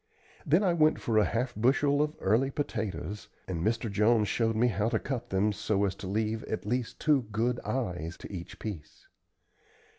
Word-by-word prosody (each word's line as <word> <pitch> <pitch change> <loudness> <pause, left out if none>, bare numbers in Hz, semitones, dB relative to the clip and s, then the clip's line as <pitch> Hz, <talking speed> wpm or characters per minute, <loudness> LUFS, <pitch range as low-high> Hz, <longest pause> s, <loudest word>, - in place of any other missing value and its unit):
Then 170 +8 +4
I 180 -3 +3
went 155 -2 +3
for 110 -2 +2
a 105 - +4
half 120 +2 -1
bushel 140 +5 +3
of 150 0 0
early 115 +8 +2
potatoes, 105 - -4 0.2
and 85 -3 -3
Mr. 115 +2 0
Jones 105 +1 +3
showed 115 +2 +1
me 115 +3 +3
how 105 +1 0
to - - +1
cut 130 -3 -4
them 100 +2 +2
so 100 0 0
as 95 - -1
to 95 - -7
leave 110 +3 -1
at 110 - -4
least 120 +2 -2
two 145 -7 +2
good 115 +3 0
"eyes" 90 -10 -3
to - - -10
each 90 -1 -7
piece. 100 -9 -8
110 Hz, 185 wpm, -29 LUFS, 100-125 Hz, 0.2 s, Then